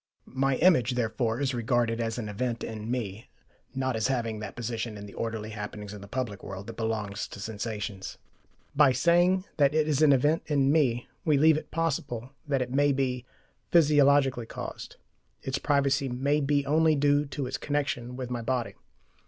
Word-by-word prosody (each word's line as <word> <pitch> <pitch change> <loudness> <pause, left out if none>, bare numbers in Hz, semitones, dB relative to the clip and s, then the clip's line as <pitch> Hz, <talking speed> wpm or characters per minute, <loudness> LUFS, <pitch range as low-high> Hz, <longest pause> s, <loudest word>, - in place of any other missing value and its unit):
My 135 +1 0
image, 135 -7 +4
therefore, 115 0 -1
is 140 -1 0
regarded 120 -1 0
as 115 0 -2
an 115 -3 -4
event 115 +3 -3
in 110 0 -6
me, 110 -4 -4 0.5
not 130 -2 -1
as 110 +1 +1
having 115 -5 -1
that 105 -2 -7
position 115 -2 -4
in 100 - -8
the 100 - -11
orderly 110 -1 -4
happenings 105 -1 -6
of 105 - -9
the 100 - -10
public 110 -3 -4
world 95 +1 -7
that 115 - -8
belongs 110 -3 -3
to - - -10
sensations. 105 -1 -5 0.6
By 140 -2 +6
saying 175 +5 +3
that 145 0 +3
it 155 -1 +2
is 150 -1 +1
an 155 -2 +6
event 145 +5 +3
in 140 -2 +2
me, 130 -6 +2 0.2
we 155 -5 +3
leave 155 +2 +6
it 155 - -5
possible 135 -7 -2 0.2
that 135 -3 +1
it 125 - -8
may 145 +2 +3
be 125 -2 -1 0.4
PHYSIOLOGICALLY 140 -6 +4
caused: - - -7 0.5
its 135 +1 -2
privacy 140 -1 +1
may 140 +4 +1
be 140 0 +1
only 155 +2 +3
due 145 0 +2
to 140 -1 -4
its 130 +1 -4
connection 135 -4 -2
with 125 -1 -5
my 120 -1 -2
body. 120 0 -1
125 Hz, 180 wpm, -28 LUFS, 115-145 Hz, 0.6 s, By